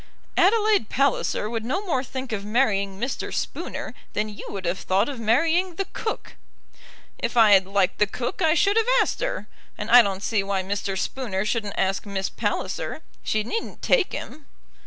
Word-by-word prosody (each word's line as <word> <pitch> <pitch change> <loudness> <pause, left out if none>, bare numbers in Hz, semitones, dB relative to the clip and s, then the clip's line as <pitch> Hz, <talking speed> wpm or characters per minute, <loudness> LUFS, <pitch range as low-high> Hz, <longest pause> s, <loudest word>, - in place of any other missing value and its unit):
"Adelaide 425 - +3
Palliser 275 -5 +1
would 225 0 -3
no 335 - -2
more 265 -8 0
think 260 -1 -6
of 205 -2 -2
marrying 200 -4 +1
Mr. 255 +5 -3
Spooner - - -4 0.2
than 210 +1 -1
you 205 - -9
would 195 -2 -5
have 175 +2 -1
thought 195 +4 +1
of 275 -4 -5
marrying 330 - +2
the 390 - -2
cook." 440 - -4 0.8
"If - - -2
I 220 -2 +7
had 190 -2 +6
liked 195 -1 +1
the 210 - +4
cook 245 - -4
I 320 -1 +4
should 400 +5 +3
have 455 +1 +3
asked - - +1
her, - - -3 0.3
and 210 +2 -4
I 245 +1 +10
don't 195 -2 -2
see 220 -3 +1
why 195 -1 -1
Mr. 195 0 -2
Spooner 205 -3 -2
shouldn't 210 -2 -2
ask 195 +2 0
Miss 195 -1 -2
Palliser. - - -3 0.2
She 215 -1 0
needn't 445 - -5
take 460 -7 +3
him." 300 -2 -7
225 Hz, 180 wpm, -24 LUFS, 200-290 Hz, 0.8 s, I